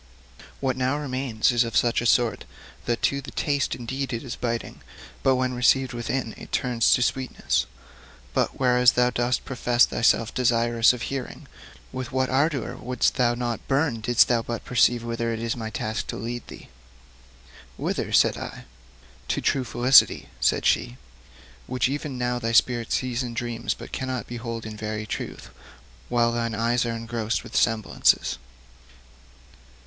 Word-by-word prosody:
What 130 -2 0
now 130 +2 0
remains 130 -6 0
is 120 0 +3
of 115 - -2
such 120 -1 +2
sort 120 -2 +2 0.4
that 120 -1 -1
to 140 0 +1
the 135 - -9
taste 145 -2 -1
indeed 130 +3 -4
it 115 - -3
is 125 - -5
biting, 115 -1 -4 0.4
but 130 - +3
when 130 0 0
received 130 +1 +2
within 120 0 -3
it - - -11
turns 120 -3 +1
to 125 - +1
sweetness. 130 +1 -1 0.7
But - - 0
whereas 125 -2 +4
thou 125 0 +3
dost 120 +1 0
profess 125 -2 +3
thyself 115 -1 +1
desirous 120 -1 +3
of 125 -2 -5
hearing, 135 -2 -5 0.4
with 130 -1 -5
what 130 -1 0
ardour 140 0 0
wouldst 125 0 0
thou 120 -1 +2
not 120 -2 -4
burn 135 -4 +1
didst 120 +2 +4
thou 120 -2 +2
but 115 0 -5
perceive 120 0 +3
whither 115 0 -2
it 110 - -4
is 115 0 -2
my 110 -2 -5
task 110 +1 -3
to - - -4
lead 120 +3 -5
thee!' - - -12 1.1
'Whither?' - - -2
said - - +4
I. - - -7 0.6
'To - - 0
true 135 - +1
felicity,' 125 +1 +4
said - - +1
she, - - +1 0.7
'which 125 - +1
even 140 0 -4
now 125 0 -1
thy 115 -1 -2
spirit 120 0 +2
sees 125 -1 0
in 120 -2 -5
dreams, 120 -1 -2
but - - -11
cannot 130 -2 -3
behold 115 -1 -6
in 110 -1 -6
very 110 0 -4
truth, 60 - -6 0.6
while 120 -1 +2
thine 115 -1 -2
eyes 120 +2 +1
are 115 - -2
engrossed 115 -1 -2
with - - -11
semblances.' 110 - +2
120 Hz, 160 wpm, -25 LUFS, 115-130 Hz, 1.1 s, whereas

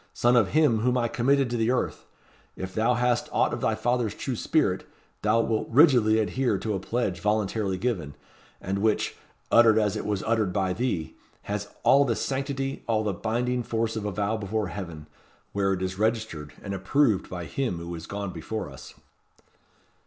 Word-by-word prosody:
son 120 +1 +3
of 110 -5 +5
him 150 -6 +3
whom 125 +3 +2
I 120 -1 +1
committed 135 +2 +2
to 120 - 0
the 115 0 +1
earth! 125 - -1 0.5
if 95 0 -6
thou 115 +3 +2
hast 120 0 +1
aught - - +2
of - - -4
thy - - +1
father's 120 -3 0
true 130 - -3
spirit, 105 - +1 0.4
thou 115 - +3
wilt 110 -1 -1
rigidly 120 -5 +5
adhere 110 0 +1
to 110 +2 -2
a 95 - -1
pledge 100 -3 -2
voluntarily 105 -1 0
given, 90 - -2 0.4
and 95 +1 -2
which, 110 +1 +1 0.4
uttered 115 -2 +6
as 105 -3 +2
it - - -3
was 100 -2 -1
uttered 110 -4 +1
by 95 -1 0
thee, 100 - -2 0.3
has 105 0 -3 0.2
all 140 +1 +6
the 120 -5 0
sanctity, 135 +1 -3
all 110 -2 +1
the 105 -2 -1
binding 120 +6 -1
force 115 -1 -1
of 110 -2 -3
a 105 - -1
vow 105 +3 -1
before 105 -1 -2
Heaven, 85 -4 -7 0.5
where 100 -1 +1
it 95 -1 -1
is 95 +1 -3
registered, 110 -9 -1
and 100 - -4
approved 100 +2 +1
by 90 -2 -5
him 125 -3 -2
who 85 +1 -6
is 85 -1 -7
gone 100 -2 -4
before 105 -7 -5
us." 70 - -12
110 Hz, 185 wpm, -26 LUFS, 95-120 Hz, 0.5 s, uttered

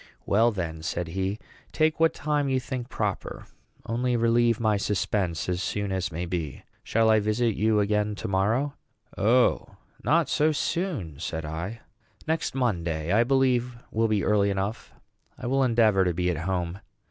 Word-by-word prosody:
"Well, 115 +4 +4
then," 85 -6 -4
said 85 +1 -3
he, 95 +3 -2 0.3
"take 155 0 +1
what 165 0 +5
time 145 -2 0
you 130 -1 +2
think 125 -1 -5
proper; - - -3 0.4
only 120 +2 0
relieve 115 0 +3
my 110 -2 +2
suspense 100 -4 -1
as 90 0 -1
soon 100 +1 -2
as 95 -1 -2
may 85 +2 -3
be. 85 -6 -4 0.2
Shall 115 0 +2
I 110 - +5
visit 110 +2 +1
you 110 0 +2
again 105 0 +1
to - - -5
morrow?" 110 +9 +1 0.4
"O, 120 +5 +2 0.3
not 165 -1 +3
so 155 +3 +2
soon," 145 - -2
said 80 -2 -4
I; 85 +9 -5 0.5
"next 160 -4 -1
Monday, 85 -10 -1
I 115 +3 +5
believe, 125 -2 +1
will 115 +1 +2
be 105 -2 +1
early 100 -1 +3
enough. 100 +3 -3 0.5
I - - -8
will 135 +2 +2
endeavor 115 -5 +4
to 90 -2 0
be 90 0 +1
at 85 - -3
home." 90 -1 -2
105 Hz, 165 wpm, -26 LUFS, 90-120 Hz, 0.5 s, what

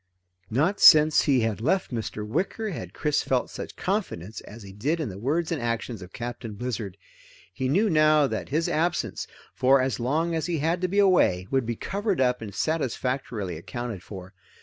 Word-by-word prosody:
Not 160 - +1
since 155 -1 +8
he 135 -4 +3
had 110 -1 -1
left 165 +2 0
Mr. 110 -2 -4
Wicker 200 - -2
had - - -6
Chris 150 -1 0
felt 130 -2 -1
such - - -7
confidence 175 - -3
as 110 +1 -12
he 95 -1 -11
did 145 - -1
in 155 - -2
the 95 0 -8
words 155 +9 -1
and 160 - -1
actions 115 -2 -3
of 90 0 -10
Captain 120 -2 -6
Blizzard. 105 -4 -4 0.6
He 130 +4 -2
knew 200 +10 +3
now 155 -4 +4
that - - -3
his 160 +4 0
absence, 170 +3 -1 0.3
for 135 +2 +4
as 130 -4 -1
long 155 +8 0
as 160 -1 -1
he 170 -2 -1
had 165 +4 0
to 185 - +1
be 195 +3 -3
away, 180 - +4
would 130 -4 +1
be 120 - -1
covered 200 - -2
up 125 -2 +2
and 100 -3 -7
satisfactorily 125 - -2
accounted 120 +1 -6
for. 95 0 -10
130 Hz, 190 wpm, -26 LUFS, 110-165 Hz, 0.6 s, since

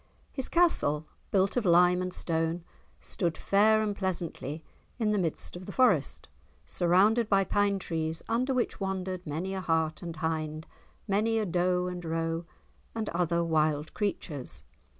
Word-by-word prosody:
His 265 - -5
castle, 160 - +2 0.2
built 195 0 +2
of 245 - +2
lime 180 0 +5
and 185 0 -2
stone, 165 0 -1 0.4
stood 170 -4 -1
fair 215 +2 +4
and 205 -1 -1
pleasantly 170 -5 -3 0.3
in 220 -3 +1
the 210 - +2
midst 165 -2 -2
of 180 +1 -9
the - - -5
Forest, 190 - +2 0.4
surrounded 190 - +3
by 195 -1 +4
pine 205 0 +1
trees 160 -3 -3
under 245 +4 +1
which 255 -2 -1
wandered 190 -2 -3
many 170 +6 -3
a 190 - -3
hart 160 -2 0
and 170 -2 -6
hind, 155 -1 -2 0.4
many 220 +3 +2
a 220 - +1
doe 180 0 +1
and 180 -1 -4
roe 165 +1 -2 0.5
and 220 -2 -2
other 170 0 +1
wild 155 -2 +1
creatures. 170 - -3
180 Hz, 150 wpm, -29 LUFS, 160-200 Hz, 0.5 s, lime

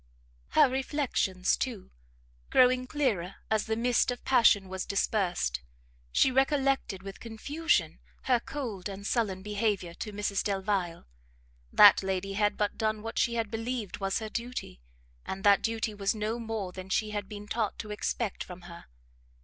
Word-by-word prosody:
Her - - +8
reflections, 260 -8 0
too, 235 -8 -4 0.6
growing 255 0 +4
clearer 225 - -1 0.2
as 220 -1 +1
the 220 - 0
mist 240 +2 +2
of 245 - -4
passion 235 -7 +5
was 190 0 -4
dispersed, 180 - 0 0.5
she 260 - +4
recollected 270 -7 +1
with 195 -1 -8
confusion 290 +9 -1 0.2
her 250 -2 +3
cold 230 -8 -5
and 200 0 -8
sullen 200 -5 0
behaviour 205 -4 -1
to 210 - -6
Mrs 205 -1 -1
Delvile. 195 - -1 0.7
That 205 -1 +8
lady 190 0 -2
had 205 +1 +1
but 210 +1 -1
done 215 -1 0
what 225 +1 -3
she 235 -1 +2
had 225 -3 -1
believed 225 -2 -3
was 195 -1 0
her 220 -1 -4
duty, 235 - -5 0.4
and 190 0 -6
that 200 -1 +6
duty 225 -1 -1
was 200 +1 0
no 215 +2 -2
more 220 -5 -4
than 185 +1 -9
she 215 +3 0
had 205 -2 -4
been 210 -1 -8
taught 220 -2 -1
to 215 - -6
expect 210 0 -2
from 180 0 -10
her. 170 -1 -11
210 Hz, 155 wpm, -29 LUFS, 195-235 Hz, 0.7 s, Her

